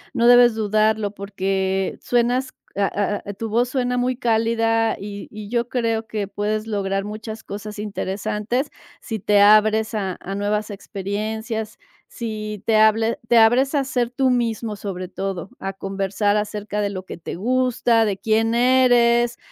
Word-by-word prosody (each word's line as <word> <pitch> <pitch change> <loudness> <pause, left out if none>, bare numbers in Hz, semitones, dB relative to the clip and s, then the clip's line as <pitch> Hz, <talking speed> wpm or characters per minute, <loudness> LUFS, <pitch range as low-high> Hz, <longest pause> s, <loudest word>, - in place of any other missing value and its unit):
no 235 -2 +2
debes 245 -1 +7
dudarlo 215 -1 +1
porque 195 -1 -2
suenas, 245 +2 0 0.2
ah 200 +1 0
ah, 205 - -6
tu 225 +3 -5
voz 240 +3 +1
suena 250 -1 -1
muy 250 +1 0
cálida 225 -2 +1
y 200 0 -7
y 210 -1 -9
yo 235 0 -1
creo 230 -2 -1
que 210 -3 -3
puedes 210 +2 -2
lograr 195 -2 -1
muchas 220 +1 -7
cosas 210 +1 -7
interesantes. 210 +5 -2 0.3
Si 225 -3 -4
te 205 +1 +3
abres 215 +2 +5
a 195 -4 -2
a 195 - -6
nuevas 210 +1 -1
experiencias, 215 +3 -4 0.3
si 215 -3 -6
te 220 -1 +3
hable 220 +1 +3
te 235 - +4
abres 250 +6 +4
a 285 - +3
hacer 250 -3 -1
tu 260 +1 +1
mismo, 230 -3 -1
sobre 190 -3 -5
todo 190 0 -5
a 195 0 -4
conversar 195 +1 -1
acerca 210 0 -2
de 205 - 0
lo 190 -2 -6
que - - -8
te 170 - -7
gusta, 240 +1 +2
de 200 -3 -1
quién 225 +2 +1
eres 240 -1 +4
215 Hz, 155 wpm, -22 LUFS, 205-235 Hz, 0.3 s, debes